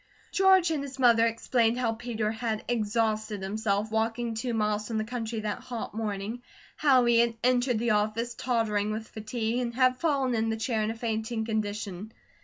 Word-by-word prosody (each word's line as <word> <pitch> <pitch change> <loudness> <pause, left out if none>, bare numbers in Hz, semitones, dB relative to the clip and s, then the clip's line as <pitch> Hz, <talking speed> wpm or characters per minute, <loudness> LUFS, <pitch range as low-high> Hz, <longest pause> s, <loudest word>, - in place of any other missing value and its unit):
George 380 -3 +5
and 305 -3 0
his 275 -1 -7
mother 235 -3 +5
explained 230 0 +1
how 235 -3 0
Peter 225 -2 -2
had 220 -1 -3
exhausted 215 -2 0
himself 210 +1 -1
walking 225 +1 -1
two 240 +3 -3
miles 210 -1 0
from 225 - -2
the 215 - 0
country 225 -1 -4
that 210 -1 -3
hot 240 -4 -6
morning, 215 +1 -3 0.3
how 265 -4 +4
he 235 -1 +4
had 235 -1 +2
entered 250 -1 +2
the 235 +1 +1
office, 215 +3 0
tottering 220 -4 0
with 220 +1 -4
fatigue, 225 +2 -2
and 235 -2 -3
had 255 0 +3
fallen 275 -5 +1
in 225 -1 +1
the 225 - -1
chair 225 0 -1
in 215 - 0
a 225 - -3
fainting 220 0 -2
condition. 210 -2 -3
225 Hz, 185 wpm, -28 LUFS, 215-240 Hz, 0.3 s, George